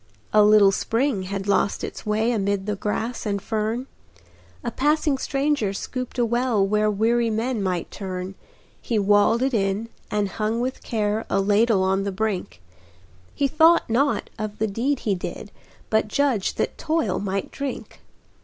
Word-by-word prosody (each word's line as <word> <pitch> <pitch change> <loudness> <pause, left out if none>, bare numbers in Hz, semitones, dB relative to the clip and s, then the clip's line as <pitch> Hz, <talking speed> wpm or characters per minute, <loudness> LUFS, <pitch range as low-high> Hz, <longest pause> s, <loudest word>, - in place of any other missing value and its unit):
A 215 - +7
little 210 -1 +6
spring 225 0 0
had 195 0 -4
lost 200 0 +1
its - - -6
way 220 +3 +1
Amid 200 -3 0
the 210 0 -1
grass 220 +4 -3
and 200 -2 -1
fern; 220 +4 -2 0.8
A - - -2
passing 295 0 +1
stranger 275 -8 0
scooped 255 +5 -5
a 240 - +3
well 235 -3 +1
Where 210 +1 +2
weary 230 +3 +2
men 225 +1 -1
might 180 -3 -2
turn, 185 -1 -5 0.5
He 230 - -1
walled 205 +4 +3
it 270 0 0
in, 200 +1 0 0.2
and 210 -1 0
hung 215 +3 -2
with 255 +2 -3
care 215 -1 -1
A 195 - +2
ladle 205 0 +3
on 190 +1 +1
the 200 - -2
brink; 190 - -3 0.7
He 280 - +2
thought 320 -2 +4
not 275 +5 +1
of 215 -1 -4
the 220 - +1
deed 245 +7 -1
he 210 - 0
did, 180 - -6 0.4
But 220 0 +2
judged 245 -3 0
that - - -2
Toil 310 - 0
might 195 -1 -3
drink. 280 -1 -6
215 Hz, 165 wpm, -23 LUFS, 200-245 Hz, 0.8 s, A